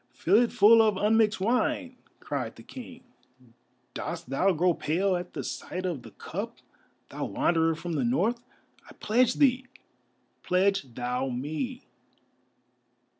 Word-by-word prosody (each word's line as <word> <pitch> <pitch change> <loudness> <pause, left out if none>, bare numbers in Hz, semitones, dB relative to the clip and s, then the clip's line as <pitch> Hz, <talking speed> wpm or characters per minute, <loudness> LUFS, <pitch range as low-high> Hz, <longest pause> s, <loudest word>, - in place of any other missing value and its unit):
"Fill 200 +7 +4
it 240 - +1
full 225 0 +7
of 215 -3 +2
unmixed 215 +1 +3
wine!" 250 +5 0 0.2
cried - - -4
the - - -13
King. 255 -1 -11 0.9
"Dost 125 - -6
thou 185 +8 +3
grow 175 +1 +2
pale 185 +5 0
at 180 0 -5
the - - -4
sight 185 +1 -5
of 170 -8 -3
the - - -12
cup, - - -6 0.5
thou - - -4
Wanderer 165 -1 +1
from 170 +1 -5
the 155 - 0
North? 240 -1 0 0.5
I - - -12
pledge 240 +3 +2
thee, 260 -2 +2 0.7
pledge 185 - +1
thou 125 +2 -2
me!" 155 - -4
195 Hz, 135 wpm, -27 LUFS, 165-240 Hz, 0.9 s, full